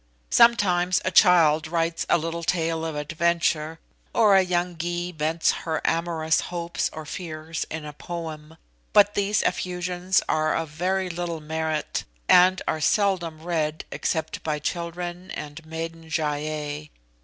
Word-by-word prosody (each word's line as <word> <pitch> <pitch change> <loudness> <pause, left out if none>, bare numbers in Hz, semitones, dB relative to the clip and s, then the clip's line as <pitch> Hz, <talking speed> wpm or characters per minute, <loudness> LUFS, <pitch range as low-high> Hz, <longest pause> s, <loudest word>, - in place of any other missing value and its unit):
Sometimes 185 -6 +4
a 185 - +1
child 165 -5 +5
writes 165 0 -1
a - - +5
little 165 +1 -3
tale 165 -1 0
of 160 -2 -3
adventure, 160 +1 0 0.4
or 215 -4 +6
a 190 - +7
young 180 -1 -1
Gy 175 +2 -3
vents 160 0 +1
her 160 -1 -2
amorous 165 -1 +1
hopes 170 -1 -2
or 155 0 -8
fears 160 -1 -5
in 160 -1 -5
a 150 - -7
poem; 160 -1 -7 0.4
but 205 0 +6
these 205 0 +1
effusions 180 +1 0
are 155 0 +1
of 165 -1 -2
very 185 +5 -1
little 170 -1 -4
merit, 155 0 -2 0.2
and 185 +1 +6
are 155 - -1
seldom 175 -4 +1
read 160 -3 -1
except 160 - -2
by 155 -1 -1
children 175 +3 -4
and 150 +2 -7
maiden 165 0 -6
Gy 160 0 0
ei. 150 0 -3
165 Hz, 145 wpm, -25 LUFS, 155-180 Hz, 0.4 s, a